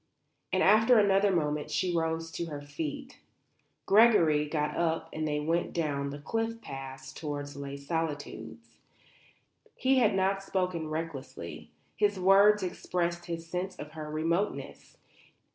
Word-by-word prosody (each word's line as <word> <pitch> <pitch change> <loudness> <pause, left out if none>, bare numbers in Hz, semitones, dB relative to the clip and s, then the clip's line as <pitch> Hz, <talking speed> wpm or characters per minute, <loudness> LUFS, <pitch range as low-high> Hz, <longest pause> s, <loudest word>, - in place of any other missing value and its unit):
And - - +2
after 220 +4 +6
another 200 -1 +4
moment 150 -5 0
she 180 -2 0
rose 165 0 -1
to 170 - -3
her 150 -3 -5
feet. 145 +1 -6 0.7
Gregory 185 -9 +5
got 150 0 -1
up 165 -1 0
and 155 0 -2
they 150 0 0
went 165 +3 -1
down 145 -4 -1
the 140 - -6
cliff 225 +9 -2
path 135 -6 -8
towards 145 -2 -5
Les 140 0 -6
Solitudes. 150 0 -5 1.0
He 265 0 +3
had 215 -5 +3
not 195 +1 +1
spoken 180 -5 -2
recklessly. 155 -3 -6 0.3
His 205 -2 +1
words 200 +2 +6
expressed 175 -1 -2
his 165 -1 -4
sense 180 +2 -4
of 150 -3 -8
her 155 -1 -7
remoteness. 165 +6 -2
165 Hz, 135 wpm, -30 LUFS, 150-195 Hz, 1.0 s, after